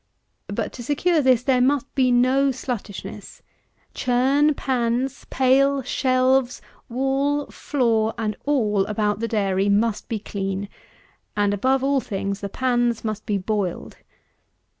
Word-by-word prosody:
But - - -3
to 240 - -8
secure 310 +5 +1
this, 255 -3 +3
there 255 -1 +2
must 275 +1 +1
be 260 -2 +2
no 255 +3 +3
sluttishness. 215 -6 -6 0.5
Churn, 270 +4 +2
pans, 250 0 -1
pail, 270 +1 +3
shelves, 255 0 +1 0.3
wall, 270 +3 0
floor, 230 -6 0
and 215 -2 -2
all 215 -9 +2
about 210 -1 -1
the 230 - -1
dairy, 200 -3 0
must 210 +1 +1
be 225 - -1
clean; 200 -1 -4 0.7
and, 205 -1 +2
above 260 +6 +1
all 275 -1 +2
things, 200 -2 -3
the 200 - -5
pans 240 -1 0
must 215 -1 -4
be 205 - +1
boiled. 195 -2 -3
245 Hz, 130 wpm, -23 LUFS, 210-270 Hz, 0.7 s, this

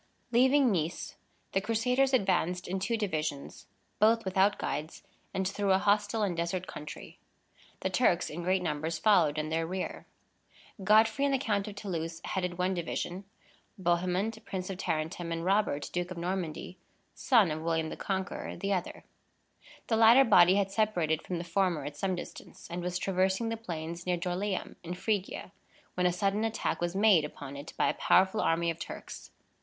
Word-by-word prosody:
Leaving 260 +2 +4
Nice, 170 -2 -2 0.4
the 195 - +1
Crusaders 250 +5 +1
advanced 180 -6 +1
in 190 +1 -2
two 230 +4 -1
divisions, 155 -9 -3 0.3
both 225 +1 +4
without 190 +2 +2
guides, 155 +3 -4 0.3
and 190 0 -1
through 200 0 0
a - - +5
hostile 205 +2 +1
and 190 -4 0
desert 170 +2 -2
country. 150 -3 -9 0.6
The - - -1
Turks, - - +2
in 165 +3 -6
great 185 +1 +1
numbers, 160 0 -2
followed 160 -5 +4
in 155 0 -2
their 165 0 -1
rear. 185 +1 -5 0.8
Godfrey 220 +6 +4
and 280 - +2
the 270 - +3
Count 210 -6 -1
of 205 - -7
Toulouse 165 -5 -4
headed 180 -2 -2
one 185 +1 +1
division; 175 +2 -4 0.5
Bohemond, 185 +5 0
Prince 185 -2 -4
of 190 - -7
Tarentum, 165 +1 -2
and 165 0 -3
Robert, 190 -7 +1
Duke 175 0 -2
of 180 - -7
Normandy 180 0 -4 0.3
(son 220 -10 +3
of 155 +1 -3
William 165 -1 0
the - - -6
Conqueror), 190 -2 -3
the 200 0 -1
other. 180 -2 -3 0.8
The 225 - +1
latter 230 +4 +8
body 180 -6 +6
had 195 -1 +1
separated 175 -7 +1
from 180 - -4
the 170 - -4
former 175 -1 0
at 145 - -6
some 185 +4 -1
distance, 175 - -10
and 175 +1 -3
was 180 0 -2
traversing 190 +4 0
the 225 - -1
plains 170 -5 -6
near 180 -1 +1
Dorylæum, 185 +2 -3
in 175 +1 -5
Phrygia, 200 +1 -2 0.4
when 180 0 +2
a - - +2
sudden 195 +4 0
attack 225 -4 -1
was 175 +1 -1
made 200 -5 +5
upon 145 -2 -7
it 140 +3 -8
by - - +3
a - - +1
powerful 190 +3 +3
army 170 +1 +1
of 165 - -9
Turks. - - -8
185 Hz, 175 wpm, -30 LUFS, 170-205 Hz, 0.8 s, latter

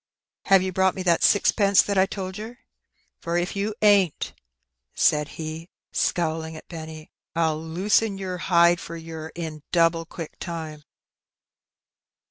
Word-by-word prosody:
"Have 195 -1 +5
you 190 - -2
brought 190 0 +2
me 185 - -4
that 170 -2 +3
sixpence 200 -1 +4
that 200 - -2
I 190 0 +4
told 190 0 -5
yer? 225 +3 -8 0.6
For, 170 +1 -2
if 175 +3 -2
you 205 +2 -2
ain't," 200 -6 +3 0.6
said 150 -1 +3
he, 160 +2 -6 0.2
scowling 160 -1 -1
at - - -13
Benny, 160 -2 -9 0.2
"Fll 160 -1 -1
loosen 200 +4 +1
yer 185 -2 -4
hide 170 0 +4
for 170 - -8
yer 160 -1 -8
in 160 -3 -6
doable 165 -1 +2
quick 165 -4 -8
time." 160 -4 -6
170 Hz, 140 wpm, -24 LUFS, 160-190 Hz, 0.6 s, Have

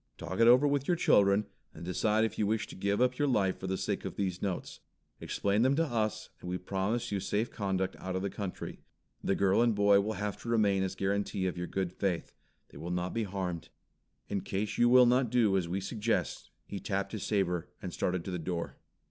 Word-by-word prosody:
Talk 95 +4 -5
it 115 - +6
over 125 +4 +7
with 140 -1 0
your 175 - +2
children 100 -7 +4 0.3
and 85 - -8
decide 105 +4 +2
if 110 - -4
you 105 - +2
wish 110 +1 0
to - - -11
give 100 +2 0
up 125 0 +2
your 145 - +3
life 100 -8 +1
for 95 - -5
the 95 0 -1
sake - - -2
of - - -5
these 95 -3 -2
notes. 95 -3 -3 0.4
Explain 100 +2 0
them 130 +3 +4
to 165 +2 +2
us, 110 -6 -2
and 90 - -7
we 90 - -1
will 90 - -17
promise 100 +6 -1
you 100 - 0
safe 105 +4 -1
conduct 95 -3 -1
out 95 0 -4
of 95 - -2
the 100 - -1
country. 100 -3 -6 0.4
The 95 - +1
girl 100 +2 +3
and 120 -2 +3
boy 100 -1 +5
will 110 +2 -2
have 105 0 -4
to 115 - -6
remain 105 -4 +3
as 95 -1 -2
guarantee 100 -1 -1
of 90 - -1
your 90 0 -4
good 95 -2 -2
faith. 95 -4 -2 0.4
They - - -12
will 85 +3 -5
not 90 +1 -2
be 115 -1 -1
harmed. 90 -4 -4 0.6
In 100 -1 -2
case 100 +3 -3
you 120 0 +5
will 125 0 +8
not 125 0 +3
do 110 -5 +3
as 90 -3 0
we 95 +3 -1
suggest 110 +3 -2
" - - -45
He 100 - -6
tapped 100 -1 -2
his 110 - -5
saber, 90 -5 0
and 90 -2 -6
started 90 -2 -1
to 95 - -4
the 90 - -3
door. 85 +1 -4
100 Hz, 235 wpm, -31 LUFS, 95-110 Hz, 0.6 s, will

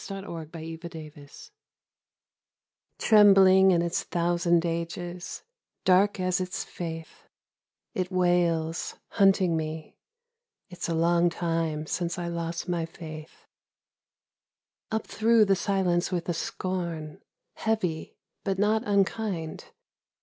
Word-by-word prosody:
91 180 -5 -6
THE 165 +1 -7
TEMPLE 160 -2 -8
BELL 145 -2 -14 1.7
Trembling 195 -3 +6
in 170 -2 +3
its 170 0 -1
thousand 175 0 +1
ages, 175 +1 -4 0.4
Dark 195 +2 +4
as 185 0 0
its 185 0 -3
faith, 165 -2 -8 0.7
It 185 0 -2
wails, 175 -3 +1
hunting 190 -4 +3
me, 155 0 -5 0.7
(It's 175 -1 -5
a 165 - 0
long 170 +1 +3
time 165 -3 -2
since 170 +2 -2
I 175 -1 -3
lost 170 0 -4
my 170 -2 -1
faith,) 155 -2 -10 1.4
Up 220 0 -2
through 225 0 +3
the 195 -1 +3
silence 190 -3 0
with 175 -2 -2
a 175 - 0
scorn, 170 -3 -4 0.3
Heavy 185 -8 -2 0.3
but 195 -1 -1
not 210 +2 +2
unkind. 200 -4 -1
175 Hz, 110 wpm, -27 LUFS, 165-190 Hz, 1.7 s, Trembling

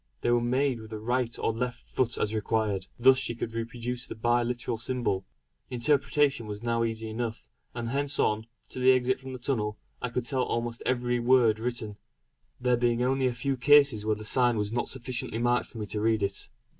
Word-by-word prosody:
They 120 - +1
were 120 0 +3
made 130 +1 +1
with 110 -1 -10
the 110 - -5
right 120 +2 -1
or - - 0
left 125 +2 -4
foot 120 -2 0
as 105 - 0
required; 105 -3 -1
thus 130 +2 +6
she 120 -2 -1
could 115 -1 -4
reproduce 120 +2 -4
the - - -7
bi 120 +2 +2
literal 120 -1 -2
symbol. 120 -6 -1 0.4
Interpretation 140 0 +1
was 105 +1 -6
now 115 -1 +1
easy 115 -1 -3
enough, 110 0 -5 0.2
and 120 -1 -3
hence 140 +2 0
on, 110 +1 +1 0.2
to - - -7
the 130 +1 +6
exit 130 0 +1
from 130 0 -8
the 130 - -5
tunnel, 110 -5 -2 0.2
I 125 - -2
could 115 0 -2
tell 130 0 0
almost 115 -1 -2
every 125 -1 +1
word 120 -3 +4
written. 115 -3 -3 0.6
There 125 -1 +2
being 120 0 +1
only 130 +1 +2
a 125 - -1
few 135 +3 -1
cases 140 -3 +5
where 110 0 +1
the 110 0 -9
sign 120 0 +3
was 105 0 -1
not 120 +1 -1
sufficiently 125 -3 -3
marked 120 +1 +1
for - - -12
me 105 - -3
to 105 +1 -4
read 110 -1 +2
it. 100 0 -2
120 Hz, 205 wpm, -28 LUFS, 110-125 Hz, 0.6 s, thus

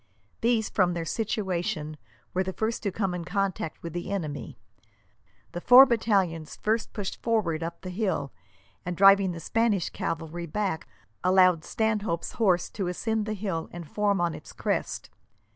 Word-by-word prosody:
These, 230 -2 +2
from 180 -2 +1
their 165 -1 -3
situation, 175 -7 -2 0.4
were 185 - +1
the 190 0 -2
first 220 +3 -2
to 200 - -1
come 195 -1 -1
in 175 -1 -4
contact 190 -2 -2
with 165 -2 -6
the 175 +1 -4
enemy. 155 -7 -4 0.9
The 175 - -5
four 250 +6 +9
battalions 195 - 0
first 220 +1 -1
pushed 205 -3 -5
forward 200 -9 0
up 170 +1 -5
the 185 - -6
hill, 180 - -1 0.5
and, 180 -1 -4
driving 195 -1 +6
the 170 - -6
Spanish 215 0 +1
cavalry 165 +1 -4
back, 190 -1 -2 0.4
allowed 185 -3 +5
Stanhope's 215 -6 -1
horse 185 -6 +2
to 195 -4 -3
ascend 220 +4 -1
the 215 - -2
hill 190 -5 -3
and 170 -2 -8
form 205 +2 +1
on 170 -1 +1
its - - -10
crest. - - -2
185 Hz, 160 wpm, -27 LUFS, 170-215 Hz, 0.9 s, four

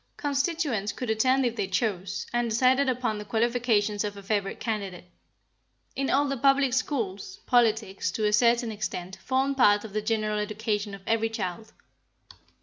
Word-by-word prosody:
Constituents 280 - -1
could 250 -3 -3
attend 255 +4 +2
if 235 -1 -1
they 205 -4 -2
chose, 190 -1 -2
and 240 -1 +1
decide 255 +4 +3
upon 245 -4 -1
the - - -5
qualifications 220 -1 +1
of 205 -1 -4
a 200 - -10
favorite 200 -1 -2
candidate. 195 -5 -4 0.8
In 275 0 -1
all 285 +2 +3
the 275 -1 -2
public 275 0 +3
schools, 255 - -2
politics 220 -6 +2
to 215 - -1
a 210 - +2
certain 235 +1 +3
extent 190 -3 -5
formed 270 +1 0
part 205 -5 +5
of 210 - -10
the 215 - -1
general 215 -1 -1
education 210 -1 -2
of 195 - -14
every 225 0 +1
child. 220 0 -5
220 Hz, 160 wpm, -27 LUFS, 205-255 Hz, 0.8 s, part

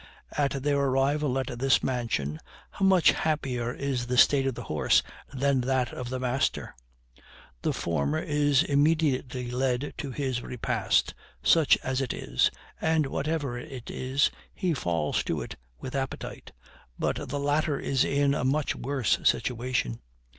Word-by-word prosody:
At 140 -2 0
their 145 -1 +2
arrival 135 +1 +1
at 125 -2 -3
this 135 +1 +3
mansion 110 - -1 0.3
how - - -5
much 190 -3 +6
happier 130 -6 -1
is 130 -2 -2
the 125 0 -1
state 135 +1 +5
of 130 - -1
the - - -6
horse - - +2 0.3
than 135 -1 +1
that 130 -1 0
of 125 -1 -5
the 130 0 -3
master! 130 +1 -1 0.9
The - - +1
former 75 -3 -1
is 145 - +2
immediately 140 -4 +1
led 130 +2 -1
to 140 - -4
his 130 -2 -2
repast, 125 -1 0 0.3
such 160 -4 +5
as 130 0 -1
it 130 - -2
is, 60 - +1 0.3
and, 160 -1 +2
whatever 140 -2 -2
it 130 -3 -8
is, 130 +2 +1 0.2
he 180 -3 0
falls 85 - 0
to - - -1
it - - -8 0.2
with 130 - -7
appetite. 135 -1 -5 0.5
But - - -2
the 145 - -2
latter 145 +1 +1
is 135 -1 +1
in 140 0 +2
a - - -1
much 140 +3 +1
worse 135 -4 0
situation. 120 - 0
135 Hz, 150 wpm, -27 LUFS, 125-145 Hz, 0.9 s, much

